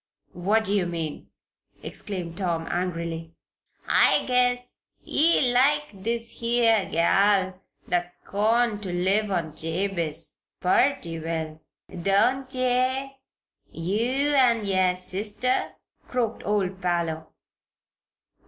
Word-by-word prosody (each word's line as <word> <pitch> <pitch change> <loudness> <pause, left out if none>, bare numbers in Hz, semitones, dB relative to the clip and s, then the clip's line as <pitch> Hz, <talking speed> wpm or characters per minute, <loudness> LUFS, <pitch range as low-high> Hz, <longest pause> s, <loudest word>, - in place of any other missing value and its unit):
"What 205 +5 +1
do 205 - -1
you 195 -4 +1
mean?" 165 -3 -5 0.6
exclaimed 180 -5 -5
Tom, 170 -3 -2
angrily. 170 -2 -4 0.5
"I - - +5
guess 250 0 +1 0.4
ye 295 -5 +3
like 295 +4 +3
this 230 +4 -4
here 230 -3 +2
gal 190 +2 +2 0.3
that's 175 0 -2
cone 220 +1 +1
to 190 -3 -5
live 195 +4 +1
on 170 -5 -2
Jabez, 165 -2 -2 0.2
purty 180 -4 +1
well; 160 -1 -4 0.4
don't 255 +8 +2
ye 255 +1 0 0.6
yeou 240 - 0
an' 240 -6 +3
yer 185 -2 +2
sister?" 205 +7 -1 0.3
croaked 235 -3 -2
old 195 -2 -1
Parloe. 170 -3 -1
195 Hz, 100 wpm, -25 LUFS, 175-240 Hz, 0.6 s, I